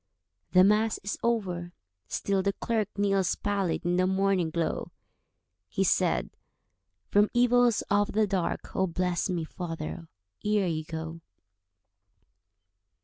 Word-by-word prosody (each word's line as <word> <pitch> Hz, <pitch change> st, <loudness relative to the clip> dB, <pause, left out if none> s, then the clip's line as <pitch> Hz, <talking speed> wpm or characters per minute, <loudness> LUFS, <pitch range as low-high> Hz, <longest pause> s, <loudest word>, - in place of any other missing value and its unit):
The 185 Hz, 0 st, +7 dB
Mass 210 Hz, +3 st, +3 dB
is 200 Hz, -, -3 dB
over—still 175 Hz, -, -2 dB
the 200 Hz, +1 st, 0 dB
clerk 220 Hz, -2 st, -1 dB
Kneels 195 Hz, -2 st, +2 dB
pallid 200 Hz, -5 st, -1 dB
in 175 Hz, 0 st, +1 dB
the 185 Hz, 0 st, +3 dB
morning 190 Hz, -2 st, +1 dB
glow. 165 Hz, 0 st, -2 dB, 0.8 s
He -, -, 0 dB
said, -, -, +1 dB, 0.8 s
"From 205 Hz, +1 st, +4 dB
evils 245 Hz, -1 st, +4 dB
of 205 Hz, 0 st, +1 dB
the 215 Hz, +1 st, +3 dB
dark 190 Hz, -4 st, -2 dB
Oh, 190 Hz, -, +2 dB
bless 180 Hz, +2 st, -1 dB
me, 175 Hz, -3 st, -1 dB
father, 165 Hz, 0 st, -6 dB, 0.4 s
ere 210 Hz, -2 st, +2 dB
you 155 Hz, -3 st, -2 dB
go. 160 Hz, +1 st, -6 dB
190 Hz, 120 wpm, -28 LUFS, 170-205 Hz, 0.8 s, The